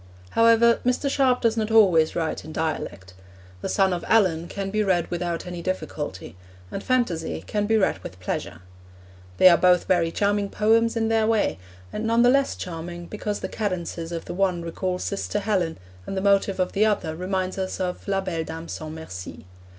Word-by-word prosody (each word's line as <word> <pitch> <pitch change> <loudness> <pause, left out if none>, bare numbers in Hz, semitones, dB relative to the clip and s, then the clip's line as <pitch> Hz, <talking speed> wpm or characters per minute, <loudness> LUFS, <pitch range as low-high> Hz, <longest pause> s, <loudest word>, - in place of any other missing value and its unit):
However, 230 0 +5
Mr. 250 +3 +1
Sharp 260 -3 +2
does 230 -1 +2
not 220 -1 -1
always 185 -8 +5
write 165 -2 -2
in 155 - -9
dialect. 150 - -4 0.5
The - - -3
Son 190 -2 +2
of 175 - -3
Allan 180 -7 +3
can 195 0 -4
be 215 +1 +1
read 180 -4 +2
without 175 -1 -2
any 180 -1 -6
difficulty, 150 - -4 0.4
and 195 - -5
Phantasy 210 -11 -1
can 205 -1 -1
be 225 +1 +3
read 190 - +1
with 90 0 -10
pleasure. 90 -1 -4 0.7
They - - +8
are 170 -3 +7
both 180 0 +4
very 175 -3 +2
charming 205 +1 0
poems 225 +3 +2
in 225 0 +1
their 225 -1 +2
way, 220 - +1 0.3
and 220 +1 -2
none 230 +1 +4
the 245 - +6
less 275 0 +2
charming 175 0 -6
because 210 +1 -4
the - - -2
cadences 175 -5 -3
of 165 -1 -5
the - - -5
one 180 -2 0
recall 180 +2 -2
Sister 200 +2 -3
Helen, 195 -5 0 0.3
and 195 - -4
the - - 0
motive 200 -1 +2
of 185 - +1
the 205 - +2
other 205 -7 0
reminds 185 +2 -2
us 190 0 -3
of 180 +1 -3
La 195 -1 +1
Belle 170 -4 -3
Dame 165 +1 -7
sans 155 -1 -6
Merci. 95 - -8
185 Hz, 190 wpm, -24 LUFS, 170-215 Hz, 0.7 s, They